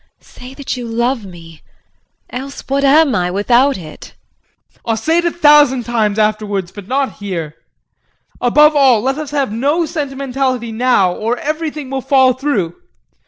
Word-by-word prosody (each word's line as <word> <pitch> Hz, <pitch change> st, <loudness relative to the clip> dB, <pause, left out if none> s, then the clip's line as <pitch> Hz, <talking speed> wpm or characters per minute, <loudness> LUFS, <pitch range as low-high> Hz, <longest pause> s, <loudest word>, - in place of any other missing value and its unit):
Say 255 Hz, +2 st, -13 dB
that 280 Hz, -2 st, -4 dB
you 245 Hz, -2 st, -6 dB
love 235 Hz, 0 st, -1 dB
me 165 Hz, -3 st, -13 dB, 0.7 s
else, 270 Hz, +2 st, -7 dB
what 275 Hz, +1 st, 0 dB
am 285 Hz, 0 st, +4 dB
I, 180 Hz, 0 st, 0 dB
without 240 Hz, +8 st, +2 dB
it? 155 Hz, -4 st, -11 dB, 0.6 s
JEAN. -, -, -32 dB
I'll 225 Hz, -1 st, -1 dB
say 320 Hz, +10 st, +1 dB
it 345 Hz, -, -2 dB
a 345 Hz, -, +1 dB
thousand 295 Hz, -6 st, +4 dB
times 220 Hz, -3 st, -1 dB
afterwards, 210 Hz, -4 st, -1 dB
but 205 Hz, -3 st, -11 dB
not 270 Hz, +2 st, -1 dB
here. 175 Hz, -7 st, -5 dB, 0.9 s
Above 300 Hz, +5 st, +4 dB
all, 265 Hz, -6 st, +4 dB
let 270 Hz, +5 st, -1 dB
us 305 Hz, -2 st, -5 dB
have 280 Hz, -4 st, -1 dB
no 285 Hz, +9 st, 0 dB
sentimentality 270 Hz, -5 st, -3 dB
now 220 Hz, -6 st, +2 dB
or 225 Hz, +6 st, -2 dB
everything 305 Hz, -2 st, -4 dB
will 270 Hz, -1 st, -2 dB
fall 260 Hz, -1 st, +3 dB
through. 240 Hz, -, -2 dB
255 Hz, 160 wpm, -16 LUFS, 215-280 Hz, 0.9 s, am